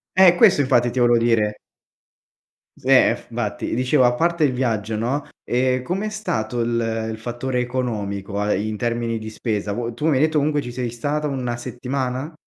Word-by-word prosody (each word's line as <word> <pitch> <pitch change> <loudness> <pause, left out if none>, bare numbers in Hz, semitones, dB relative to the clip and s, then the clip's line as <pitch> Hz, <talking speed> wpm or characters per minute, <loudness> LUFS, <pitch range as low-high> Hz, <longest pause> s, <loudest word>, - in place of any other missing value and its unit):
Eh, 185 -2 +7
questo 145 - +5
infatti 125 -3 +3
ti 130 - -2
volevo 120 -1 +5
dire. 110 -3 +2 1.2
S - - -19
eh - - +6
f - - -15
vatti - - -3
dicevo, 130 +2 +3
a 120 - +4
parte 170 +4 +1
il 130 - +1
viaggio, 115 -4 -1
no, 130 +7 -1 0.2
ehm, 130 +1 +1
com'è 190 +9 -2
stato 120 - -2
il 115 -1 -1
il 110 - -6
fattore 120 +3 -3
economico 105 -6 -3
a 105 0 +1
ehm, - - 0
in 110 - -3
termini 115 0 -1
di 110 0 -6
spesa, 105 -2 -3
vuoi 120 +1 -3
tu 150 +7 -2
mi 150 - +3
hai 130 - +2
detto 155 -1 +2
comunque 145 0 +1
ci 125 - -7
sei 120 -1 -3
stata 145 +6 -2
1 125 -4 -3
settimana? 130 +4 -4
120 Hz, 195 wpm, -22 LUFS, 115-135 Hz, 1.2 s, Eh